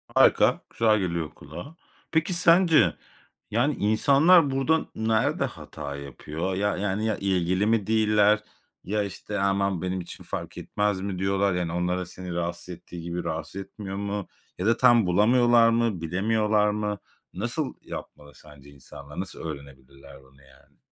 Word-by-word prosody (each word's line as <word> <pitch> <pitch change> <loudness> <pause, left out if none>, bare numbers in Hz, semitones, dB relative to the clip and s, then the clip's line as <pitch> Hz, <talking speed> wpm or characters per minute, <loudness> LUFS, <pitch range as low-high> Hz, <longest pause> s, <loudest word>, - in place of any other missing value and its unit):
Harika, - - +4
güzel 110 -2 +2
geliyor 85 -4 -2
kulağa. 85 - -11 0.4
Peki, 160 +2 +1
sence, 165 - +4 0.5
yani, 130 +7 +2
insanlar 140 - +4
burada 145 +4 +1
nerede 110 0 +1
hata 70 0 -7
yapıyor? 75 +6 -5
Ya 105 0 0
yani, 105 +2 -1
ya, 110 -2 0
ilgili 95 0 0
mi 110 -2 +1
değiller, 105 -1 +3 0.4
ya 105 +1 -1
işte 100 +1 -5
aman 100 -2 +1
benim 90 0 -2
için 85 - -10
fark - - -6
etmez 105 -2 -1
mi 95 -2 -4
diyorlar, 95 0 +1
yani 90 -2 -2
onları 90 +1 -1
seni 90 0 -8
rahatsız 85 +1 -4
ettiği 85 -1 -9
gibi 85 +1 -4
rahatsız 80 +4 -4
etmiyor 95 0 -8
mu? 100 -1 -3 0.3
Ya 90 - -3
da 115 +1 +3
tam 120 -4 +5
bulamıyorlar 115 +5 +4
mı, 115 -6 0
bilemiyorlar 105 +4 +1
mı? 105 -1 -2 0.3
Nasıl 120 - -3
yapmalı 75 -2 -10
sence 70 -2 -16
insanlar? 70 +2 -11
Nasıl 95 - -5
öğrenebilirler 70 -2 -10
bunu 70 +1 -23
yani? 65 0 -24
100 Hz, 145 wpm, -26 LUFS, 85-110 Hz, 0.5 s, tam